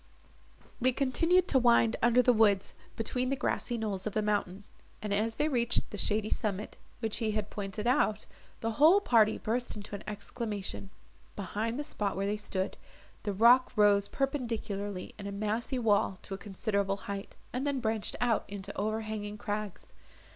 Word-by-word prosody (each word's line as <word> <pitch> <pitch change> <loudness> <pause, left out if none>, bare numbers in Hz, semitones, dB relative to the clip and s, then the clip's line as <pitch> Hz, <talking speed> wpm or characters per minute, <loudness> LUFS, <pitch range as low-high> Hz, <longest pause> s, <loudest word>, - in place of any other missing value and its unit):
They 255 +1 +3
continued 330 +8 +2
to 265 - +4
wind 235 -2 +4
under 240 +2 +5
the 250 - +5
woods, 205 -3 +3 0.2
between 250 +3 -1
the 275 - +1
grassy 245 -2 -1
knolls 210 -3 -2
of 210 - -3
the 215 - +1
mountain, 205 -2 -1 0.4
and, 210 -1 -3
as 220 +2 0
they 300 - +1
reached 240 -5 +1
the 205 - -5
shady 210 +2 +2
summit, 210 -1 -2 0.3
which 220 -2 -1
he 220 -2 -1
had 210 -1 -3
pointed 205 +1 -4
out, 235 -4 +2 0.4
the 225 - 0
whole 315 - +6
party 225 - +4
burst 240 +2 -2
into 210 0 -9
an 200 - -5
exclamation. 205 -1 -4 0.5
Behind 215 +4 -3
the 295 - -2
spot 210 -10 -3
where 195 - 0
they 205 +1 0
stood, 195 -2 -3 0.4
the 205 - -2
rock 235 +6 +6
rose 205 -2 +4
perpendicularly 220 -8 -3
in 200 - -5
a - - -4
massy 215 +5 -2
wall 205 -5 +2
to 195 - -7
a - - -3
considerable 200 -1 -1
height, 200 0 -5 0.2
and 260 +3 -1
then 280 -2 0
branched 220 -3 -1
out 240 -2 +2
into 200 0 -7
overhanging 215 0 -3
crags. 210 -2 -4
215 Hz, 170 wpm, -31 LUFS, 205-240 Hz, 0.5 s, whole